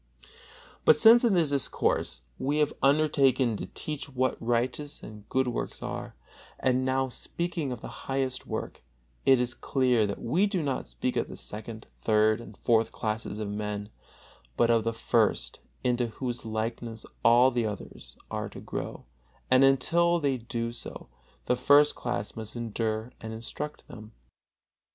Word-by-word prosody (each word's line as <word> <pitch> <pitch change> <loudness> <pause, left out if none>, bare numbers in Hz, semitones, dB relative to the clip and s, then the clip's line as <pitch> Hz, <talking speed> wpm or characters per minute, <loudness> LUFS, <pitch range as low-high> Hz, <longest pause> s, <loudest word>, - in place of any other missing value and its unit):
But 155 - +7
since 225 +9 +8
in 225 -5 +4
this 160 -5 +2
discourse 135 - 0 0.2
we 145 +3 0
have 150 -1 +2
undertaken 135 -4 +3
to - - -5
teach 150 -2 -6
what 130 -1 0
righteous 125 +5 -1
and 105 -1 -11
good 130 0 +1
works 120 - -4
are, - - -5 0.4
and 130 -1 +2
are - - 0
now 130 0 +1
speaking 165 +2 -4
of 120 -3 -5
the - - -9
highest 135 -1 -1
work, - - -5 0.5
it 135 -2 +7
is 125 0 0
clear 125 -5 +2
that 100 - -4
we 175 - +2
do 190 -5 -1
not 135 -3 -2
speak - - -3
of - - 0
the - - -9
second, 110 +1 -7 0.2
third 110 +1 +3
and - - -12
fourth 115 -2 +3
classes 110 -1 -3
of 105 -1 -3
men, 105 0 -4 0.7
but 120 0 +4
of 115 -1 +3
the 115 - +2
first, 115 -1 +1 0.2
into 125 -1 +1
whose 120 +1 -5
likeness 115 0 -4 0.2
all 120 +3 +6
the 120 -2 0
others 105 -2 -7
are - - -3
to - - -10
grow, - - -6 0.5
and 130 +1 +6
until 170 +6 +4
they 140 -4 +1
do 115 0 -3
so 120 - -7 0.4
the 125 - +2
first 145 +4 +5
class 120 -4 -4
must 110 0 -8
endure 115 0 -2
and 110 0 -6
instruct 135 +6 -6
them. 110 -2 -11
125 Hz, 160 wpm, -28 LUFS, 110-135 Hz, 0.7 s, since